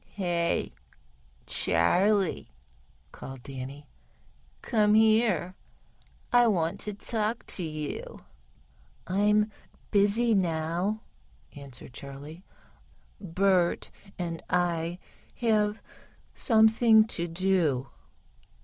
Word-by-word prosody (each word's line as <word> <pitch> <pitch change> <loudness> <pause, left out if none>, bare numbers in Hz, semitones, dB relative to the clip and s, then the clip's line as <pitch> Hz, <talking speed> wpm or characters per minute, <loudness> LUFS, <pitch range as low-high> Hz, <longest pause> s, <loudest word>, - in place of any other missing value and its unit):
"Hey, 175 -3 -1 0.7
Charley," 185 - +1 0.6
called 135 -2 -10
Danny, 135 +1 -8 0.8
"come 210 -3 +3
here, 215 -6 +3 0.8
I 245 -1 +6
want 170 -6 0
to 210 -1 -5
speak 220 +1 -2
to - - 0
you." 155 -3 -5 0.8
"I'm 210 +3 +2 0.4
busy 215 +3 +4
now," 175 +3 -1 0.5
answered 135 -3 -11
Charley. 140 +6 -10 0.8
"Bert 185 -1 +1 0.3
and 170 -2 -4
I 175 -1 0 0.4
have 215 -2 0 0.5
something 220 -1 +5
to 175 -6 -4
do." 165 -7 0
185 Hz, 75 wpm, -28 LUFS, 160-215 Hz, 0.8 s, I